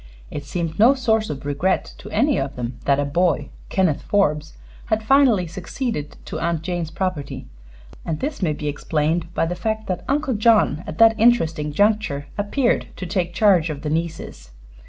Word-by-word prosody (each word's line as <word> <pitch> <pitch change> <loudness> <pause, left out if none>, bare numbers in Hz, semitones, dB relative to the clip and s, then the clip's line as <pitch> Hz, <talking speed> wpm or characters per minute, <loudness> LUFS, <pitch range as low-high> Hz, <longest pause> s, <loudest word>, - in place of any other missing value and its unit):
It 145 - -6
seemed 165 +3 -4
no 245 +6 +6
source 225 -4 +1
of 140 -1 -6
regret 150 +7 0
to - - -10
any 285 -1 +2
of 135 0 -3
them 120 0 -5
that 140 -1 +3
a 145 - +1
boy, 155 0 +1 0.2
Kenneth 180 -7 +1
Forbes, 155 -7 0 0.3
had 220 -1 0
finally 250 -6 +4
succeeded 180 - -4
to - - -5
Aunt 170 -2 -1
Jane's 175 -2 -3
property, 170 -6 -4 0.6
and 160 -2 -3
this 285 -2 -4
may 160 -5 +1
be 150 0 -5
explained 160 +3 -1
by - - +2
the 170 - -2
fact 220 +3 -3
that 185 -3 -3
Uncle 280 -1 0
John 215 -5 +4
had 175 - -12
at - - -6
that 225 0 +5
interesting 165 -10 +3
juncture 205 -5 +1
appeared 240 +5 0
to 185 - -6
take 175 -1 -2
charge 185 -6 +4
of 145 -2 -6
the 150 - -2
nieces. 160 - -4
175 Hz, 180 wpm, -22 LUFS, 150-220 Hz, 0.6 s, no